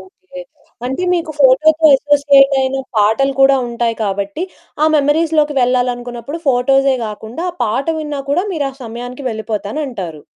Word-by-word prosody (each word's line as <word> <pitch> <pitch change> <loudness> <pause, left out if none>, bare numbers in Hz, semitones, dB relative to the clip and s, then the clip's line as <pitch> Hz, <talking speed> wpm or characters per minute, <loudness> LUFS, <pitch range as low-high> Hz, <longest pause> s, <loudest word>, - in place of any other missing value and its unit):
Okay. 375 +5 -13 0.5
అంటే 265 +8 -3
మీకు 335 -2 -2
ఫోటోతో 310 +4 +4
అసోసియేట్ 280 -1 +4
అయిన 265 0 -1 0.2
పాటలు 220 +7 +2
కూడా 270 0 +6
ఉంటాయి 235 -1 -2
కాబట్టి, 200 - -3 0.4
ఆ - - +5
మెమోరీస్‌లోకి 300 0 +1
వెళ్ళాలనుకున్నప్పుడు, 245 +3 -2
ఫోటోసే 270 +1 +2
కాకుండా, 220 +9 -7
ఆ - - -20
పాట 240 +5 -2
విన్నా 295 -2 -4
కూడా, 355 +7 +1
మీరు 290 -4 -1
ఆ - - -18
సమయానికి 245 +4 -8
వెళ్ళిపోతానంటారు. 215 - -5
270 Hz, 135 wpm, -16 LUFS, 235-295 Hz, 0.5 s, కూడా